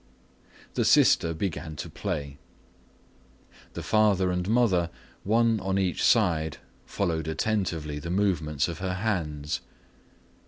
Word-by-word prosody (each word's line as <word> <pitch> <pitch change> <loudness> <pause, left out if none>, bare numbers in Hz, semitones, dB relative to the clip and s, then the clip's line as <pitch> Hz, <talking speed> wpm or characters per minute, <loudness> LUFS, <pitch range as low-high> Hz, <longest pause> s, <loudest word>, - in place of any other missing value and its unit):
The - - +1
sister 85 - +4
began 80 -2 -4
to 70 - -6
play. 70 -1 -5 1.3
The - - -6
father 100 -4 +3
and 90 +1 -2
mother, 105 -8 +3 0.3
one 115 +1 +2
on 95 0 -1
each 95 -3 0
side, 85 -9 +2 0.3
followed 80 -5 -1
attentively 80 -4 -1
the 85 - -6
movements 85 -6 0
of 85 -2 -6
her 95 0 -2
hands. 80 -8 -2
90 Hz, 115 wpm, -27 LUFS, 80-100 Hz, 1.3 s, sister